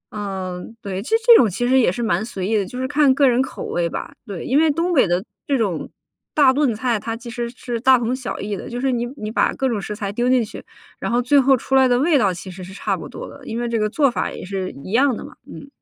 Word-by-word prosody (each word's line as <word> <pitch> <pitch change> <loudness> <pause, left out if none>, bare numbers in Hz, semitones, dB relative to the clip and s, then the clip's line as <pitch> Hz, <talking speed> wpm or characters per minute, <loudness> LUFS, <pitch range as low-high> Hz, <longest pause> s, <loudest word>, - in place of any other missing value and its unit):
嗯， 190 0 -5
对。 195 -1 -4
这 345 - 0
这 475 -1 +9
种 225 - +4
其 245 +7 -2
实 260 +1 +4
也 230 - +3
是 235 +6 -4
蛮 200 -2 +1
随 195 -5 -4
意 220 - +1
的， 205 - +1
就 250 - -7
是 260 - -1
看 290 -1 +4
个 280 -2 +4
人 250 0 +3
口 265 - -5
味 170 -1 -1
吧。 - - -6
对， 195 -4 -6
因 275 +4 +3
为 320 -1 +4
东 335 +4 0
北 265 - +4
的 175 +2 0 0.2
这 275 -2 +2
种 195 -8 -2 0.5
大 275 -3 +6
炖 275 -5 +1
菜， 235 0 0
它 225 +2 -4
其 235 0 -9
实 240 -1 -3
是 240 -1 -5
大 260 0 +6
同 240 +1 -1
小 260 -2 -5
异 205 0 -3
的。 - - -7
就 245 - -4
是 265 +1 +1
你 240 -1 -1
你 215 -3 -5
把 - - +2
各 265 - -1
种 225 -5 -1
食 210 - -5
材 200 -2 -4
丢 240 +4 0
进 255 -3 +3
去， - - -10 0.4
然 - - -3
后 240 - +2
最 275 +3 +4
后 265 0 +4
出 270 - -6
来 265 -1 +6
的 245 -1 +3
味 300 +4 +3
道 200 -4 +3
其 180 +1 -7
实 185 +1 -9
是 185 - -10
差 - - -1
不 - - -8
多 - - -8
的， - - -13
因 230 - -4
为 240 - -2
这 230 -1 -1
个 215 0 +1
做 280 +2 +2
法 - - -2
也 - - -8
是 190 -1 -3
一 - - -8
样 255 +1 +3
的 - - -8
嘛。 - - -12 0.2
嗯。 280 - -10
235 Hz, 310 characters per minute, -21 LUFS, 205-260 Hz, 0.5 s, 这